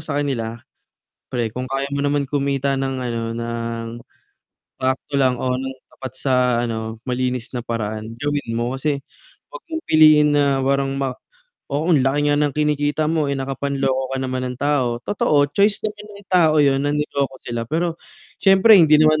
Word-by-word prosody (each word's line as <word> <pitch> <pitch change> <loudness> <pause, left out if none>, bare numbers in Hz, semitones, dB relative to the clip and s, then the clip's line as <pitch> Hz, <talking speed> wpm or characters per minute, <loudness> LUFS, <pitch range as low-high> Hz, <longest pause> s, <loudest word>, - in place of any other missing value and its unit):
sa 150 -3 -3
kanila, 115 -5 -2 0.7
"Pre 120 -3 -1
kung 130 +1 -4
kaya 135 +1 -2
mo 140 - -1
naman 145 0 +1
kumita 140 0 0
ng 135 0 -2
ano, 120 -2 -3
ng 115 0 -4 0.9
sakto 130 +2 -2
lang 130 -2 +3
o 125 0 0
ng 130 0 -4 0.2
tapat 130 -1 -8
sa 130 0 0 0.3
ano, 110 -1 -4
malinis 125 -1 -2
na - - -2
paraan, 110 -1 -4
gawin 145 -5 -2
mo 120 +3 -2
kasi 140 0 -1 0.5
'wag - - -9
mong 320 +1 -4
piliin 155 -1 +6
na 140 -2 +2
parang 135 0 +1
ma 135 -2 -1 0.6
oo 160 +5 +1
laki 145 +1 +2
nga - - +2
ng 145 -2 +1
kinikita 150 0 +1
mo, 160 -3 0
eh, 140 - -1
nakapanloko 135 -1 -2
ka - - -3
naman 130 -1 -2
ng 125 - -6
tao." 130 -5 0
Totoo, 145 -3 +1
choice 200 +1 +2
naman 210 0 -4
ng 195 - -23
tao 170 -4 +4
'yon 140 -1 +3
na 145 - +1
niloko 140 -2 -1
sila 120 -1 -3
pero, 165 +2 -1 0.4
syempre 195 +2 +7
hindi 155 -4 +6
naman 155 0 +4
140 Hz, 170 wpm, -21 LUFS, 125-150 Hz, 0.9 s, syempre